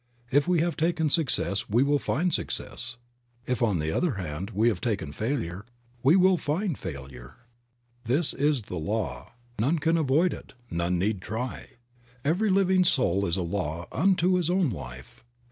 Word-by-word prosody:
If 145 +4 +3
we 180 -3 +3
have 170 0 0
taken 160 -1 +1
success 130 - +1
we 115 +5 +4
will 145 +1 +2
find 175 +6 0
success; - - -4 0.5
if, 125 -1 -1
on 105 -6 +2
the 80 0 -1
other 170 - +1
hand, 90 0 -4
we 110 +1 +2
have 100 -6 -2
taken 100 - -2
failure 105 - -3 0.4
we 140 +7 +5
will 185 -1 +5
find 165 +3 -1
failure. 65 - -8 0.7
This 140 +7 +1
is 145 -3 +1
the 90 - -6
law; 105 +8 -3 0.3
none 140 +10 +2
can 165 +2 +2
avoid 160 +4 +2
it, - - -11 0.2
none 85 +1 0
need 100 +1 0
try. 115 +6 -5 0.5
Every 180 +9 +2
living 190 -1 +4
soul 100 - +2
is 85 +2 -1
a 90 - -1
law 85 -2 -3
unto 185 0 +3
his 175 -2 0
own 180 -6 +2
life. 65 - -9
125 Hz, 165 wpm, -27 LUFS, -, 0.7 s, we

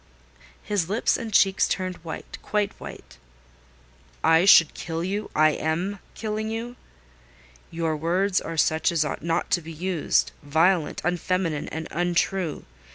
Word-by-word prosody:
His 195 -5 -1
lips 215 +4 +2
and 225 -1 -5
cheeks 195 -1 +4
turned 185 -1 -2
white—quite 200 +5 -3
white. - - -11 1.0
"I 165 +2 +5
should 165 -5 +7
kill 165 0 -4
you—I 190 -5 +1
am 175 +7 -2 0.2
killing 215 0 -3
you? 230 +2 -5 0.9
Your 165 -1 -1
words 180 +5 +1
are 165 0 -6
such 160 +1 +2
as 160 -3 +1
ought 150 - -4
not 165 +2 -1
to 175 - +2
be 165 +1 -9
used: 175 +1 0
violent, 160 +3 +2
unfeminine, 175 -3 -1
and 160 +1 -5
untrue. 175 -1 -1
175 Hz, 130 wpm, -25 LUFS, 160-195 Hz, 1.0 s, should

